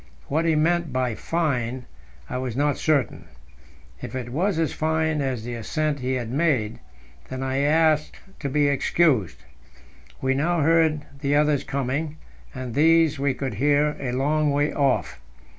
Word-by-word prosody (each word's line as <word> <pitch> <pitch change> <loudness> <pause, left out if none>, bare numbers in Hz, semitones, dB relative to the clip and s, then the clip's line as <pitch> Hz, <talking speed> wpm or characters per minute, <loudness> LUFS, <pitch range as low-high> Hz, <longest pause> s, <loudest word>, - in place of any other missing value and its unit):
What 160 +4 +1
he 165 -1 +3
meant 170 0 +1
by 125 -2 0
"fine" 130 -5 -2 0.4
I 125 - -3
was 125 -3 -4
not 145 +1 +1
certain. 145 -8 0 0.8
If 125 0 -7
it 120 -2 -5
was 180 +6 0
as 165 -2 0
fine 160 -1 0
as 130 -5 -2
the 120 +1 -5
ascent 150 +6 -2
he 130 +1 -2
had 120 -3 -3
made, 135 -7 0 0.5
then 130 0 -4
I 135 0 -1
asked 155 +1 +2 0.2
to 140 - -3
be 145 +1 +2
excused. 130 - +1 0.8
We 130 0 +1
now 160 +5 +1
heard 160 -1 +3
the 140 0 0
others 150 -1 +2
coming, 140 +3 -3 0.3
and 130 -3 -6
these 160 +1 +4
we 140 -1 0
could 130 -4 -3
hear 145 +6 +2
a 130 -3 -3
long 150 +3 +1
way 145 +1 +1
off. 105 - 0
145 Hz, 160 wpm, -24 LUFS, 130-155 Hz, 0.8 s, these